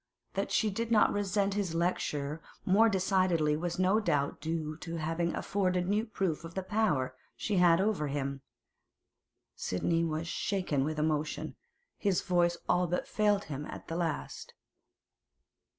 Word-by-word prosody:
That - - -2
she 215 -2 +2
did 230 +4 -2
not 220 - +5
resent 200 0 +1
his 195 -5 -1
lecture 155 -3 -1 0.2
more 220 +5 +5
decidedly 185 -6 +2
was 170 +3 -3
no 185 +4 +3
doubt 145 -11 0
due 155 -1 -2
to 165 +1 -6
its 160 - -4
having 165 +2 0
afforded 185 -3 0
new 210 +4 +1
proof 190 -7 -2
of 165 0 -9
the 190 - -2
power 185 -10 0 0.2
she 205 -3 -1
had 175 -1 +6
over 195 -6 +1
him. 140 -1 -3 1.1
Sidney 165 - 0
was 160 0 -2
shaken 180 -7 0
with 155 +2 -2
emotion; 155 0 -1 0.4
his 195 -4 +1
voice 175 -2 +2
all 180 0 +3
but 175 +2 -1
failed 210 -2 +2
him 145 0 -5
at - - -9
the 165 - -3
last. 165 -3 -3
175 Hz, 150 wpm, -31 LUFS, 155-195 Hz, 1.1 s, had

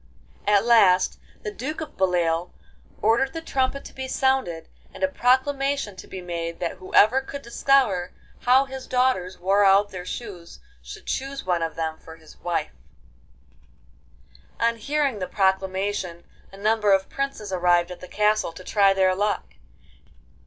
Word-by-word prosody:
At 205 0 +4
last 195 -6 +4 0.2
the 425 - -3
Duke 305 -2 -5
of 315 -1 -7
Beloeil 175 -2 +1 0.5
ordered 235 +6 +2
the 325 - -4
trumpet 275 -3 -1
to - - -11
be 265 0 -5
sounded, 260 - 0 0.2
and - - -8
a - - +5
proclamation 275 -3 +1
to - - -10
be 190 - -7
made 170 -1 -4
that 170 - -3
whoever 215 +7 +4
could 280 +1 -8
discover 235 -7 +2 0.3
how 260 +2 +4
his 265 -1 -8
daughters 250 -8 +1
wore 195 +3 +2
out 200 +1 +4
their 180 -1 -6
shoes 180 - -8 0.2
should - - -11
choose 275 -2 -4
one 175 -2 0
of 165 -1 -2
them 160 -1 -3
for 160 - -12
his 160 -1 -17
wife. 170 -3 -2 1.9
On 230 0 +1
hearing 275 0 -1
the 185 - -3
proclamation 190 -2 -1 0.3
a 195 - -12
number 210 0 +2
of 190 0 +2
princes 275 -8 -4
arrived 175 -1 +2
at 180 - -8
the 180 - -10
castle 210 -3 +1
to 185 - -11
try 195 0 +3
their 190 -1 +3
luck. 205 +2 -2
200 Hz, 155 wpm, -24 LUFS, 180-260 Hz, 1.9 s, a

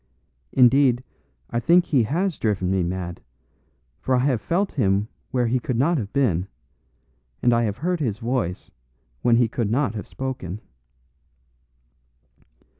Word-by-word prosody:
Indeed, 130 -1 +4 0.5
I 120 - 0
think 175 +8 +4
he 140 -6 +2
has 170 - -1
driven 95 -4 0
me 95 -1 +1
mad; 90 0 -4 0.8
for 130 - +1
I 125 +1 +2
have 130 -6 +1
felt 190 - 0
him 100 -5 +1 0.2
where 125 -2 +1
he 125 +2 +1
could 125 0 -2
not 155 +5 +2
have 100 -4 -5
been, 100 - +1 1.0
and 120 - +4
I 115 0 +2
have 105 -1 -2
heard 180 +2 -1
his 115 -9 -1
voice 115 -6 -3 0.5
when 120 -1 +4
he 120 0 +4
could 115 -1 -2
not 125 -1 +1
have 105 - -6
spoken." 125 -8 -5
120 Hz, 145 wpm, -23 LUFS, 105-135 Hz, 1.0 s, Indeed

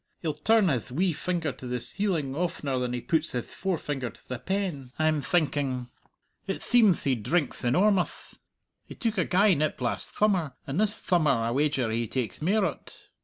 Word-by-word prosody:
He'll 155 -2 0
turn 210 +7 +3
hith 125 -4 -1
wee 175 +6 +1
finger 170 -1 -2
to 130 - -9
the 125 0 -2
ceiling 165 - -1
oftener 150 -5 -1
than 125 -1 -1
he 125 -1 -3
puts 160 +3 0
hith 120 -2 -4
forefinger 145 -9 -2
to - - -18
the 125 -2 -4
pen, 180 -5 -2
I'm 155 -1 +2
thinking. 140 -7 0 0.6
It 195 - -3
theemth 220 -8 +4
he 135 - +2
drinkth 145 +8 -1
enormuth! 180 +9 +1 0.5
He - - -9
took 225 -4 -1
a 175 - +2
gey 195 +2 +4
nip 155 -1 0
last 120 -2 -2
thummer, 185 -10 +2
and 140 +6 -2
this 215 0 +1
thummer 170 -5 +2 0.2
I 115 - 0
wager 135 -3 +1
he 115 +1 -1
takes 125 +3 -3
mair 195 +5 +2
o't. 165 - -7
155 Hz, 180 wpm, -27 LUFS, 130-185 Hz, 0.6 s, theemth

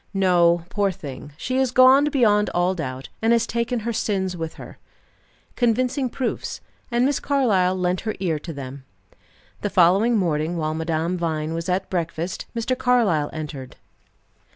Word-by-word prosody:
No, 175 -3 +3
poor 205 -1 +1
thing, 145 -6 -9
she 255 +10 -1
is 265 -1 +2
gone 255 +3 +6
beyond 220 -8 +3
all 175 +1 +2
doubt, 130 -7 -5
and 225 +1 +3
has 230 -1 +2
taken 235 +1 -2
her 235 +2 -2
sins 190 -4 -1
with 165 -2 -5
her." - - -11 0.8
Convincing 250 +2 +1
proofs; 250 0 -3 0.3
and 240 0 +2
Miss 280 0 +1
Carlyle 210 -10 +2
lent 180 0 0
her 220 - -3
ear 170 -5 -1
to 165 - -7
them. 135 -2 -8 0.8
The 205 - -1
following 195 +7 +4
morning 165 -2 0
while 155 -1 -1
Madame 160 +2 -1
Vine 160 -2 -2
was 165 +1 -4
at 180 +1 0
breakfast, 170 0 -3
Mr. 235 +2 0
Carlyle 225 -13 +2
entered. 145 -4 -7
185 Hz, 155 wpm, -23 LUFS, 165-235 Hz, 0.8 s, gone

